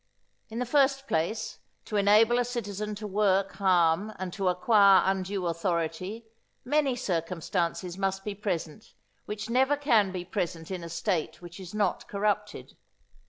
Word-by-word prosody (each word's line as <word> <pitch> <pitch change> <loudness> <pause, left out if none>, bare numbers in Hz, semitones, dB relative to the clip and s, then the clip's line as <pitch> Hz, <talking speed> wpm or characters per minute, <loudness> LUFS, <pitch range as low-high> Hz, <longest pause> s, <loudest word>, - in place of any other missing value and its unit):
In 225 - -7
the 250 - -1
first 275 +1 +2
place, 175 +6 -2 0.3
to 215 - -5
enable 215 +4 +5
a - - +3
citizen 210 -4 -4
to 210 +1 -7
work 195 -1 +1
harm 185 +1 +3
and 185 -2 -5
to 195 -2 -2
acquire 195 +1 +5
undue 190 0 -1
authority, 170 +5 -2 0.4
many 280 -1 +2
circumstances 175 -2 -2
must 195 0 -1
be 210 - -3
present 195 -1 -5 0.3
which 210 +1 -5
never 265 +5 +2
can 230 -9 +3
be 180 -1 -5
present 170 -1 -4
in 180 -2 -4
a 170 - -7
State 170 0 -2
which 175 +1 -11
is 185 +1 -9
not 210 -1 0
corrupted. 210 +1 -2
200 Hz, 150 wpm, -28 LUFS, 180-220 Hz, 0.4 s, enable